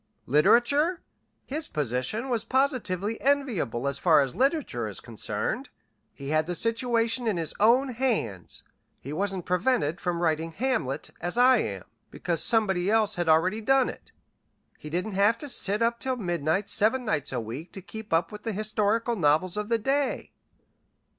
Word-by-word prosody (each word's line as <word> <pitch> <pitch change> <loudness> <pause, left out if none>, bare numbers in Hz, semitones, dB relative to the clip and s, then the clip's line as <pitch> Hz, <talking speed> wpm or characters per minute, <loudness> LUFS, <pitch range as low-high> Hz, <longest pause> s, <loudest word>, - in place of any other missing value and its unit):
Literature? 265 - +3 0.4
His 300 +3 -4
position 145 - -2
was 235 -4 0
positively 230 - 0
enviable 235 - 0
as 140 0 0
far 160 -4 +5
as 135 -3 -2
literature 265 - 0
is 105 - -6
concerned. 115 - -4 0.4
He 140 -1 -8
had 155 +1 +1
the 180 - -2
situation 230 +2 0
in 210 -5 0
his 165 -2 -2
own 245 +6 +4
hands. 225 - -2 0.4
He 140 - -7
wasn't 190 +1 -2
prevented 180 - 0
from 175 -2 -2
writing 165 -1 -1
'Hamlet,' 225 - -2
as 175 +6 +1
I 250 +1 +6
am, 100 - -4 0.3
because 170 -2 -2
somebody 195 -5 +2
else 215 -1 +2
had 175 -3 -1
already 185 +7 +3
done 265 +3 +3
it. - - -11 0.7
He 150 - -9
didn't 180 +7 -2
have 205 +4 +3
to 290 - -7
sit 210 -4 +3
up 235 0 0
till 260 -1 -2
midnight 175 -1 -1
seven 245 +5 +2
nights 150 - -1
a 125 - -2
week 120 +9 -7
to 195 - -8
keep 220 +2 -9
up 165 +1 +1
with 210 0 -9
the 225 -1 -3
historical 215 +3 0
novels 165 +1 +2
of 210 +1 -4
the 230 - +2
day. 270 +5 -1
205 Hz, 165 wpm, -26 LUFS, 160-235 Hz, 0.7 s, I